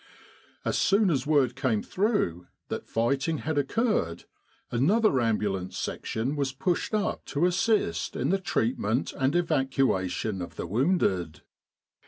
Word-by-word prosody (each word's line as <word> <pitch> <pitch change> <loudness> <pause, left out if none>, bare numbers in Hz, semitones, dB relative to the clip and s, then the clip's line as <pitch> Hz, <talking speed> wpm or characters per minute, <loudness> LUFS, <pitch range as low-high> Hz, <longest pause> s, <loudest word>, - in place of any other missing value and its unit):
As - - 0
soon 200 -1 +3
as 140 -2 -1
word 140 -5 +3
came 115 -7 0
through 185 - 0 0.2
that - - -4
fighting 135 +7 0
had 155 0 -1
occurred, 140 - 0 0.5
another 155 - +3
Ambulance 100 -5 -1
Section 120 +6 -3
was 140 -3 -1
pushed 175 +8 -1
up 210 - -1
to 145 +5 0
assist 180 - +1
in 130 - -1
the 195 +2 +2
treatment 115 - 0
and 135 +3 0
evacuation 125 - 0
of 85 - -7
tfce - - -5
wounded. 100 - +1
135 Hz, 130 wpm, -27 LUFS, 105-175 Hz, 0.5 s, soon